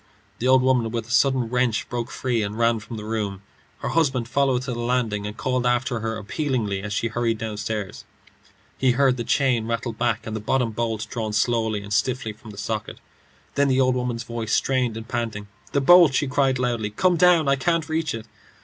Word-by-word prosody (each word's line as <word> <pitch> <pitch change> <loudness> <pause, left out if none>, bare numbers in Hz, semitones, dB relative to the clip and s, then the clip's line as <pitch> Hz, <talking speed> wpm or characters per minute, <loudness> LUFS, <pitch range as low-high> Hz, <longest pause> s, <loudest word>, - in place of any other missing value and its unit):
The 125 - 0
old 130 0 +5
woman 125 -3 +2
with 115 -1 -4
a - - -9
sudden 130 -3 +3
wrench 125 -1 0
broke 120 -1 -4
free 125 -3 -1
and 105 +1 -3
ran 115 -1 +2
from 110 +2 -8
the 105 - -7
room. 105 -3 -3 0.4
Her - - -2
husband 135 -8 +1
followed 130 -1 +1
to 125 -1 -3
the 120 - -5
landing, 120 -4 -1
and 105 - -7
called 130 -1 -1
after 125 0 +1
her 110 0 -3
appealingly 110 -3 -2
as 105 +1 -6
she 115 +3 -1
hurried 115 0 0
downstairs. 105 -2 -4 0.8
He 130 -2 +3
heard 130 0 +3
the 120 - -3
chain 120 -2 +1
rattle 115 0 -2
back 115 -1 -1
and 110 - -4
the - - -2
bottom 120 +2 0
bolt 115 -1 -2
drawn 110 -3 -4
slowly 110 -2 +1
and 100 +1 -5
stiffly 115 +1 0
from 110 +1 -14
the 100 - -11
socket. 110 +1 -4 0.5
Then 140 0 +2
the 130 -1 +2
old 130 -1 +3
woman's 125 -2 -2
voice, 115 -2 -4
strained 125 -4 +1
and 115 0 -8
panting. 115 -4 -3 0.2
"The 140 - +1
bolt," 170 -1 +7
she 145 - +2
cried, 130 0 +1
loudly. 120 -4 -1
"Come 180 - +2
down. 175 -3 +4
I 140 - +4
can't 160 +4 0
reach 160 -4 -1
it." 110 -1 -7
120 Hz, 210 wpm, -23 LUFS, 110-130 Hz, 0.8 s, bolt